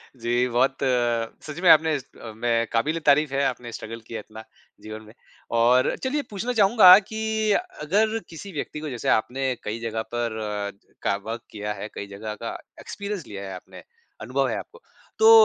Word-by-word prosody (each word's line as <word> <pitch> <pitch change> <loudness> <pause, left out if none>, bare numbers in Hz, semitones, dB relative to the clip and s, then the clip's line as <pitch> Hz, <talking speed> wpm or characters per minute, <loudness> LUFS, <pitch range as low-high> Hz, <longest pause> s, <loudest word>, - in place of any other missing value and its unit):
जी, 120 +1 +1
बहुत 125 +3 +2 0.7
सच 150 +2 -6
में 180 - +6
आपने 160 0 +7
अ, 125 -4 -8
में 115 0 +1
काबिल-ए-तारीफ़ 150 +3 +2
है 140 +1 +1
आपने 125 -2 -3
स्ट्रगल 115 +1 -7
किया 115 - -5
इतना 110 +1 -11 0.4
जीवन 110 0 -8
में। 110 - -14 0.5
और 125 +2 +4
चलिए 285 +3 0
पूछना 225 +5 -3
चाहूँगा 195 -3 +9
कि 220 - -5 0.6
अगर 215 +8 +2
किसी 170 +5 -9
व्यक्ति 150 -1 -5
को 155 0 -5
जैसे 120 -4 -3
आपने 130 +5 -3 0.2
कई 110 +2 -4
जगह 115 -1 -3
पर 120 -2 -1 0.7
का - - +2
वर्क 115 +1 -4
किया 105 0 -4
है, 105 0 -6
कई 100 - -5
जगह 105 +1 -5
का - - -4 0.2
एक्सपीरियंस 200 -4 -5
लिया 100 -1 -7
है 95 - -6
आपने, 90 -1 -12 0.4
अनुभव 130 +5 0
है - - -1
आपको। 475 +2 -12 0.4
तो 445 0 +8
125 Hz, 170 wpm, -25 LUFS, 110-165 Hz, 0.7 s, चाहूँगा